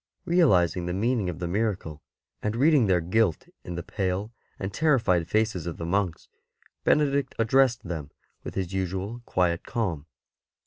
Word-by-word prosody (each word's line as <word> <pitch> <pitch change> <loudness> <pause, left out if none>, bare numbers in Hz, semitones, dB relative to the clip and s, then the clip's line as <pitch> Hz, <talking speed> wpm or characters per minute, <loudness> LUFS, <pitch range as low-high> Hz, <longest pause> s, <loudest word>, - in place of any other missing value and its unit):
Realizing 95 - +3
the 90 - -2
meaning 110 -1 +1
of 85 - -5
the 85 0 -3
miracle, 90 -6 -2 0.4
and 105 +1 -1
reading 140 -2 +4
their 90 -2 +3
guilt 95 +1 +1 0.2
in 90 - -6
the 85 - -4
pale 95 +3 -2 0.3
and 95 +1 -4
terrified 115 - +2
faces 110 -6 0
of 85 - -4
the 85 - -5
monks, 90 -1 -1 0.6
Benedict 140 -2 +2
addressed 120 +1 +3
them 80 -5 -5 0.3
with - - -7
his 95 -1 -3
usual 95 +5 -3
quiet 90 -2 +1
calm. 85 - -3
95 Hz, 150 wpm, -26 LUFS, 85-115 Hz, 0.6 s, reading